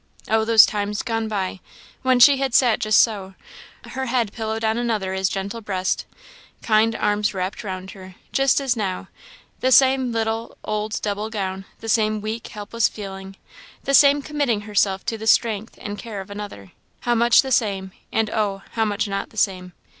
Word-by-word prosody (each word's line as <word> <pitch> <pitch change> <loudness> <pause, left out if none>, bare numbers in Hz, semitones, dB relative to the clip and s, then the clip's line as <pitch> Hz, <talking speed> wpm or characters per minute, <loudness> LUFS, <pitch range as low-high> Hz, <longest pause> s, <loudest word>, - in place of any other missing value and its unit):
Oh, 220 0 +2
those 225 -1 +8
times 205 0 -3
gone 225 -2 -2
by! 195 -3 -3 0.4
when 255 -1 +3
she 275 +3 +8
had 265 -2 -1
sat 240 -4 +4
just 215 0 +3
so; 195 -4 -1 0.5
her 265 0 -4
head 235 -4 0
pillowed 220 0 -3
on 220 0 +1
another 215 -6 -1
as 190 0 0
gentle 200 +4 -4
breast; 190 -3 -2 0.6
kind 225 0 +3
arms 210 0 0
wrapped 185 +2 -3
round 190 -1 -6
her, 185 -2 -12 0.2
just 270 0 +3
as 270 -3 0
now; 195 -5 -3 0.5
the 260 - +1
same 260 -1 +5
little, 225 0 -2
old 215 +1 -2
double 210 +1 -2
gown; 195 -3 -4 0.2
the 225 - -7
same 215 -1 +2
weak, 215 +2 -5
helpless 210 +2 -1
feeling; 195 -2 -8 0.5
the 275 - -1
same 280 +1 +6
committing 285 -8 -1
herself 200 -2 0
to 225 - -3
the 220 - -5
strength 225 -1 +2
and 205 0 -6
care 215 -1 -6
of 195 +1 -9
another; 200 - -8 0.3
how 240 - +1
much 235 +2 +5
the 265 - -5
same, 195 -6 0 0.2
and, 220 -1 0
oh! 200 -3 -1
how 225 - 0
much 210 0 -1
not 195 0 -3
the 220 - -18
same! 185 -3 0
215 Hz, 180 wpm, -22 LUFS, 195-230 Hz, 0.6 s, those